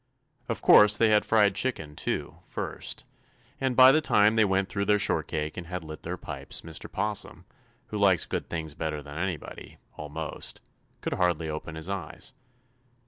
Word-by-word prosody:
"Of - - -3
course 105 0 +7
they 115 - +4
had 105 0 +4
fried 105 -3 +4
chicken, 100 -9 -2
too, - - -3
first, - - -4 0.5
and 130 -2 0
by 130 +1 +9
the 155 +3 +3
time 105 -6 +4
they 110 - +5
were 95 -1 +2
through 100 +1 -3
their 105 0 +4
shortcake 75 -5 -1
and 90 -1 -6
had 90 -1 -5
lit 80 0 -9
their 90 +2 -4
pipes - - -4
Mr. 80 0 -8
'Possum, 105 +1 -3 0.4
who 105 - -3
likes 95 -4 +4
good - - -4
things 80 -2 -4
better 75 -1 -4
than 75 +3 -8
anybody, 90 -3 -5 0.2
almost, 75 +1 -5 0.4
could - - -2
hardly 85 -3 +1
open 75 +1 -5
his 80 +2 -4
eyes. 100 -1 -5
90 Hz, 170 wpm, -28 LUFS, 80-105 Hz, 0.5 s, by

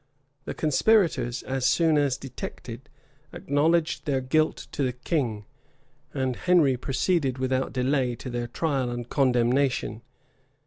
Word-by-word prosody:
The - - -5
conspirators, 155 - +2
as 130 -1 -3
soon 155 +5 +3
as 140 -3 +2
detected, 135 -3 -8 0.4
acknowledged 155 +3 +1
their 135 -2 +1
guilt 155 +5 0
to - - -4
the 130 -2 0
king; 125 -6 -2 0.4
[*] 145 +1 -39
and 130 -2 -1
Henry 165 -6 +3
proceeded 135 +2 0
without 130 0 -1
delay 130 -1 0
to 125 - -8
their 120 0 -3
trial 135 -2 -1
and 120 -1 -5
condemnation. 125 -3 +1
135 Hz, 130 wpm, -26 LUFS, 125-150 Hz, 0.4 s, soon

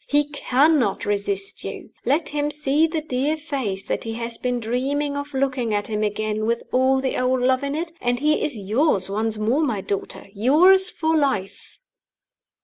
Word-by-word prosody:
He 290 0 +3
cannot 285 -4 +2
resist 200 -1 -1
you. - - -7 0.2
Let 295 +6 +1
him 295 0 -1
see 300 +1 +2
the 320 -1 -2
dear 295 +1 -1
face 265 -11 -3
that - - -3
he 225 - -4
has 230 0 -4
been 250 -1 -1
dreaming 275 +5 -1
of 285 0 -5
looking 260 -5 0
at 205 - -1
him 215 -1 -2
again 215 +1 -1
with 235 0 0
all 260 +1 +3
the 265 - -1
old 255 0 +1
love 255 +1 +2
in 280 0 -2
it, 330 +2 -3
and 245 0 0
he 300 +2 +2
is 285 -6 -2
yours 205 - +1
once 220 +1 -1
more, 225 +8 +1
my 245 -10 0
daughter 200 0 -4
yours 350 - +5
for 320 0 0
life." 205 -10 -1
255 Hz, 180 wpm, -23 LUFS, 215-290 Hz, 0.2 s, yours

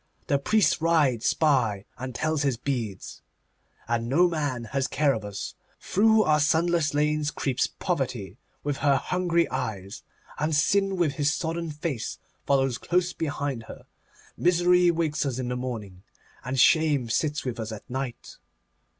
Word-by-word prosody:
The 140 - +1
priest 210 +4 +2
rides 150 -8 +2
by 125 -11 +2
and 130 -1 -7
tells 155 -2 0
his 135 -5 +1
beads, 120 -7 -4 0.7
and 115 0 -1
no 175 +7 +4
man 145 -8 -2
has 135 -1 +1
care 145 -1 +2
of 110 - -4
us. 100 -1 -6 0.3
Through 220 +2 +3
our 150 -4 +3
sunless 160 0 +2
lanes 150 0 +1
creeps 135 -3 -1
Poverty 130 - -3 0.2
with 145 -1 -2
her 140 -1 +3
hungry 170 +4 +1
eyes, 105 -7 -4 0.4
and 155 +1 0
Sin 195 +5 +2
with 170 -5 +2
his 145 -1 +2
sodden 165 +1 -3
face 150 -5 -4 0.3
follows 135 -3 +2
close 180 0 0
behind 145 -6 -3
her. - - -11 0.5
Misery 180 0 +4
wakes 160 -3 0
us 135 -4 -2
in 125 -1 -3
the 125 - -2
morning, 110 -7 -5 0.4
and 130 +1 -2
Shame 150 -2 +4
sits 150 +6 -1
with 120 -3 -3
us 110 0 -4
at 110 - -9
night. 130 -1 -5
145 Hz, 150 wpm, -26 LUFS, 125-165 Hz, 0.7 s, no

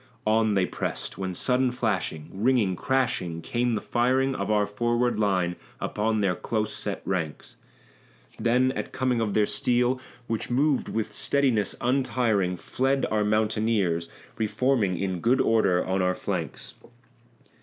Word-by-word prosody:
On 110 -1 +3
they 95 -2 +3
pressed, - - -5
when 95 -1 -3
sudden 125 +5 +2
flashing, 100 -10 -2
ringing, 105 -2 +2
crashing, 95 -8 0
came 120 +6 0
the - - -2
firing 130 +3 +1
Of 100 -5 -3
our 105 -1 +3
forward 120 +2 0
line 95 -4 +1 0.2
upon 110 0 0
their 95 -2 +2
close 110 +3 -2
set 100 -2 -4
ranks; 85 -6 -3 0.8
Then 125 +2 +3
at - - -5
coming 125 -3 0
of 105 -3 -1
their 105 - +4
steel, 125 +1 +1 0.2
which 115 -2 -3
moved 140 +2 +1
with 110 -1 -2
steadiness 125 -5 +1
untiring. 120 -8 +1
Fled 135 +7 0
our 105 -1 +2
mountaineers, 105 -5 +1 0.3
re 110 - +1
forming 115 -7 +1
in 95 -1 -2
good 120 +8 +2
order 110 -6 +3
on 95 0 0
our 90 0 +1
flanks. - - -4
110 Hz, 145 wpm, -26 LUFS, 95-125 Hz, 0.8 s, their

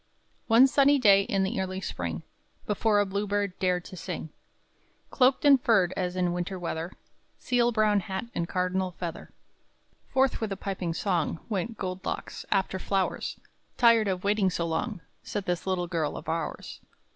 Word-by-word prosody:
By - - -43
Clara - - -43
Doty - - -42
Bates. - - -40
One 235 +4 +7
sunny 285 0 +5
day, 200 -5 +6
in 195 -1 0
the 190 0 -1
early 185 0 -3
spring, 85 - -4 0.4
Before 210 0 +2
a 205 - +3
bluebird 200 -1 -2
dared 180 -1 0
to - - -9
sing, 165 -3 -6 0.8
Cloaked 260 +2 +3
and 275 -3 +7
furred 195 -7 +3
as 180 0 -2
in 180 -1 +1
winter 180 +2 -3
weather, 170 0 -4 0.4
Seal 240 -1 +1
brown 215 -2 +3
hat 190 +1 -4
and 170 0 -2
cardinal 185 0 -1
feather, 170 -2 -6 0.8
Forth 265 -2 +1
with 220 -2 -2
a 195 - -3
piping 185 -4 -3
song, 170 -4 0
Went 220 +2 -2
Gold 185 -1 -4
Locks - - -5
"after 190 -1 +1
flowers." 195 0 -1 0.4
"Tired 230 -3 +5
of 185 -2 -2
waiting 200 -1 +2
so 170 -1 -2
long," 170 +4 -2 0.2
Said 205 -2 -4
this 175 +1 -2
little 185 -2 0
girl 165 -4 -2
of - - -9
ours. 165 -1 -4
190 Hz, 180 wpm, -28 LUFS, 180-210 Hz, 0.8 s, One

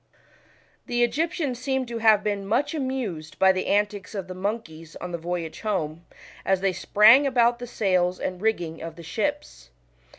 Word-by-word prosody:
The 240 0 +1
Egyptians 295 0 -1
seem 265 0 -1
to 235 -1 -5
have 220 -2 +5
been 200 -2 -2
much 275 +8 +1
arrived 255 - -4
by 190 0 +6
the 185 0 -2
antics 205 0 0
of 195 -2 -4
the 185 - -6
monkeys 185 -5 -5
on 180 - -7
the 170 - -4
voyage 170 -1 -4
home, 170 -6 -3 0.4
as 190 -1 +1
they 195 -1 +1
sprang 220 +9 +6
about 240 -2 +3
the 245 - -6
sails 185 -5 +1
and 180 0 -4
rigging 175 -7 -1
of 165 -1 -7
the 170 - -11
ships. - - -4
200 Hz, 170 wpm, -25 LUFS, 175-240 Hz, 0.4 s, by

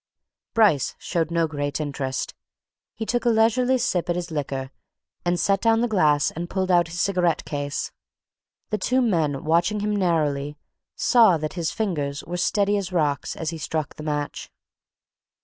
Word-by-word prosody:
Bryce 205 - +3
showed 165 -2 -1
no 170 -1 +2
great 145 -2 -3
interest. 140 -3 -3 0.6
He 220 - -4
took 240 +2 0
a 240 - +3
leisurely 235 +3 +3
sip 190 -8 -1
at 175 - +1
his 175 -1 -4
liquor 135 -3 -3 0.5
and 175 0 +1
set 195 -1 +2
down 225 0 +3
the 240 - +2
glass 150 -9 +3
and 170 +2 -5
pulled 190 -1 -1
out 175 -1 +4
his 170 +2 -6
cigarette 175 -3 +1
case. 145 -1 -3 0.8
The 215 - 0
two 255 +1 +1
men, 160 - +1
watching 175 +6 +2
him 210 0 0
narrowly, 150 -6 0 0.4
saw 225 -8 +5
that 155 0 -4
his 170 -3 -1
fingers 150 -9 -2
were 175 +1 -5
steady 205 +3 +2
as 190 -2 -3
rocks 150 -5 0
as 160 0 -3
he 165 - -6
struck 155 -1 -3
the - - -10
match. 150 -1 -3
170 Hz, 165 wpm, -24 LUFS, 150-205 Hz, 0.8 s, saw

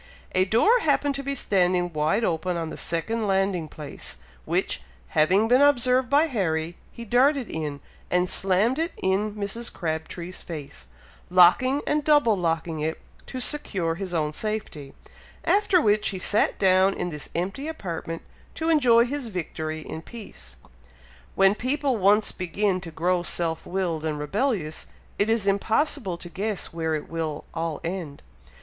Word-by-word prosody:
A 185 0 +3
door 325 - +4
happened 290 -4 +1
to 275 - -4
be 275 +1 -2
standing 180 -6 +1
wide 155 +9 +1
open 175 -1 0
on 165 -1 -3
the - - -6
second 215 +7 -2
landing 190 -4 +1
place, 150 -1 -9 0.3
which, - - -1 0.3
having 190 +8 +3
been 250 +3 +5
observed 255 -3 +3
by 290 +2 +5
Harry, 175 - -1 0.2
he 235 - -9
darted 260 +2 +3
in, 150 -3 -4 0.3
and 180 0 +2
slammed 195 +10 +2
it 330 +1 -1
in 200 +3 0
Mrs. 210 +3 -3
Crabtree's 170 +2 -4
face, 145 -4 -8 0.4
locking 185 +11 +5
and 300 0 +1
double 290 -7 +4
locking 165 -2 -1
it, 160 +1 -2 0.3
to 255 - -5
secure 195 - 0
his 185 +2 -5
own 155 -3 -1
safety, 205 -9 -5 0.5
after 400 -2 +4
which 210 -7 +2
he 195 - -4
sat 205 +3 +1
down 190 0 +4
in 175 - -3
this 150 -2 -6
empty 195 - -2
apartment 170 - -5 0.3
to 320 0 -1
enjoy 245 -7 +5
his 275 0 -4
victory 160 -5 -4
in 160 - -7
peace. 215 - -10 0.8
When 195 0 +5
people 260 +3 0
once 205 +2 +4
begin 185 +1 -1
to 175 - -7
grow 175 +3 0
self 165 -2 -1
willed 175 -4 -2
and 155 -2 -2
rebellious, 175 - -2 0.3
it 205 - +2
is 225 -3 +2
impossible 200 - 0
to 175 - -10
guess 200 +2 -3
where 160 -1 -1
it 150 - -5
will 160 -2 -4
all 165 -2 -3
end! 170 -4 -5
190 Hz, 155 wpm, -25 LUFS, 165-235 Hz, 0.8 s, been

